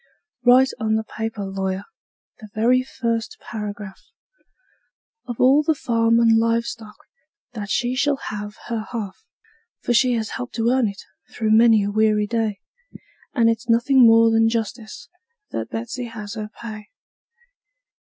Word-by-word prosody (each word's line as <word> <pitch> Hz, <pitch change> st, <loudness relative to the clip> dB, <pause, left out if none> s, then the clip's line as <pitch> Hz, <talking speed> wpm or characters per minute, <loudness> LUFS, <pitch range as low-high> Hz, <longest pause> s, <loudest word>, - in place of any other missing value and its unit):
Write 255 Hz, +2 st, +5 dB
on 220 Hz, 0 st, 0 dB
the 220 Hz, -, 0 dB
paper, 220 Hz, -2 st, -5 dB
lawyer 195 Hz, 0 st, -3 dB, 0.6 s
the 215 Hz, -, -12 dB
very 245 Hz, +4 st, +3 dB
first 230 Hz, -4 st, -3 dB
paragraph 205 Hz, -3 st, -7 dB, 1.3 s
Of 240 Hz, -2 st, -6 dB
all 270 Hz, +4 st, +5 dB
the 310 Hz, +1 st, +1 dB
farm 230 Hz, -3 st, +2 dB
and 225 Hz, -1 st, +5 dB
live 230 Hz, 0 st, +1 dB
stock 220 Hz, -3 st, -8 dB, 0.6 s
that 205 Hz, -4 st, -6 dB
she 245 Hz, +3 st, 0 dB
shall 280 Hz, +2 st, +1 dB
have 210 Hz, -5 st, -7 dB
her 225 Hz, -2 st, -4 dB
half; 215 Hz, -, -5 dB, 0.6 s
For 240 Hz, -, 0 dB
she 250 Hz, +2 st, +3 dB
has 225 Hz, -2 st, -2 dB
helped 250 Hz, -1 st, -6 dB
to 230 Hz, +1 st, +1 dB
earn 255 Hz, -3 st, +2 dB
it, 200 Hz, 0 st, -7 dB, 0.3 s
through 220 Hz, -2 st, -1 dB
many 225 Hz, -1 st, +5 dB
a 200 Hz, -, -2 dB
weary 215 Hz, 0 st, +2 dB
day, 220 Hz, -2 st, -2 dB, 0.7 s
And 230 Hz, -3 st, +4 dB
it's 230 Hz, +1 st, -1 dB
nothing 245 Hz, +3 st, +4 dB
more 225 Hz, 0 st, +6 dB
than 225 Hz, 0 st, +3 dB
justice 225 Hz, -1 st, -5 dB, 0.4 s
that 110 Hz, -, -4 dB
Betsey 115 Hz, -, -5 dB
has 210 Hz, -3 st, -8 dB
her 215 Hz, -2 st, -6 dB
pay. 215 Hz, -2 st, -8 dB
225 Hz, 150 wpm, -22 LUFS, 210-235 Hz, 1.3 s, more